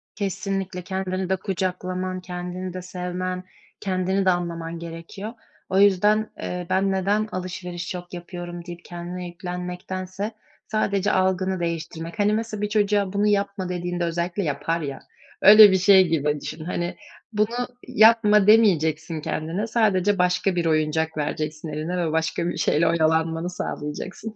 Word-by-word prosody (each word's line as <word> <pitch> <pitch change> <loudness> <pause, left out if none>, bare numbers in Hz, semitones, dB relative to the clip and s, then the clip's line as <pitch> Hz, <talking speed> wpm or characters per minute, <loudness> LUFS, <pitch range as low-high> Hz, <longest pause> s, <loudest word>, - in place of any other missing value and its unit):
Kesinlikle. 195 -2 -3
Kendini 185 0 -3
de 190 - +3
kucaklaman, 185 -1 -3
kendini 180 0 -5
de 185 - -5
sevmen, 180 0 -4 0.4
kendini 190 0 0
de - - +5
anlaman 170 -1 -3
gerekiyor. 170 +6 -7 0.4
O 190 - +2
yüzden, 205 +2 +4
eee, 180 -1 -4
"Ben 195 +1 +2
neden 200 +3 +1
alışveriş 180 -1 -5
çok 180 -1 -7
yapıyorum?" 175 0 -7
deyip 175 -1 -9
kendine 175 +1 -6
yüklenmektense 185 +3 -5 0.4
sadece 205 -2 +1
algını 185 0 +1
değiştirmek. 165 +2 -4
Hani, 210 +1 +3
nasıl 220 -2 -4
bir 210 - -1
çocuğa, 205 -2 +1
"Bunu 205 +1 +2
yapma." 200 -2 0
dediğinde 175 0 -2
özellikle 170 +3 -1
yapar 155 +2 -1
ya, 140 -2 -5 0.4
öyle 210 0 +10
bir 190 - +4
şey 190 0 +6
gibi 150 -2 0
düşün. 155 0 -6
Hani, 175 0 -2 0.4
"Bunu 230 +4 0 0.2
yapma." 220 -3 +5
demeyeceksin 160 -7 +3
kendine, 165 +9 -2
sadece 205 -4 +2
başka 180 +1 +2
bir 175 - 0
oyuncak 160 0 +1
vereceksin 155 +1 -3
eline 155 +4 -3
ve 170 -3 0
başka 160 +1 0
bir - - -4
şeyle 165 +3 +2
oyalanmanı 160 +1 +1
sağlayacaksın. 180 +6 -5
180 Hz, 140 wpm, -24 LUFS, 170-195 Hz, 0.4 s, öyle